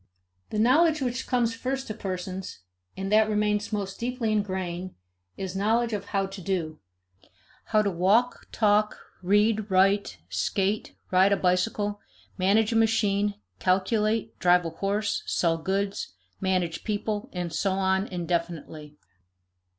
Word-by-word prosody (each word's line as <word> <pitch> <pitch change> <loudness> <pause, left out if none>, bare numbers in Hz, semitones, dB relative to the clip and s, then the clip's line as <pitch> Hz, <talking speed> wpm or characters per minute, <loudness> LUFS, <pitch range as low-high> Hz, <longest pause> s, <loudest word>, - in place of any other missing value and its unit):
I. - - -7
The - - +1
knowledge 310 +6 +4
which 250 0 -2
comes 240 -3 +1
first 265 +3 -3
to 215 - -5
persons, 185 - -5 0.4
and 195 +1 -3
that 215 0 +5
remains 210 0 0
most 200 -2 -3
deeply 240 -2 -1
ingrained, 185 -3 -2 0.4
is 190 -1 -5
knowledge 225 +4 +1
of 200 -1 -3
how 195 -1 0
to 195 0 -8
do; 170 -4 -2 0.9
how 215 -1 +2
to 200 - 0
walk, 200 +8 +2
talk, 210 -1 +2 0.2
read, 210 +3 +2
write, 195 +2 +3
skate, 200 +2 -1 0.2
ride 190 +2 +5
a - - +2
bicycle, 205 +3 0 0.4
manage 210 +4 +2
a - - -1
machine, 210 -2 +2 0.2
calculate, 210 +4 +1
drive 180 0 +4
a 165 - -3
horse, 205 +3 -1
sell 165 -2 +1
goods, 195 - -2 0.2
manage 185 -3 -1
people, 210 0 -2
and 175 -2 -4
so 195 +4 0
on 190 +1 +1
indefinitely. 170 -4 -4
200 Hz, 135 wpm, -26 LUFS, 185-215 Hz, 0.9 s, that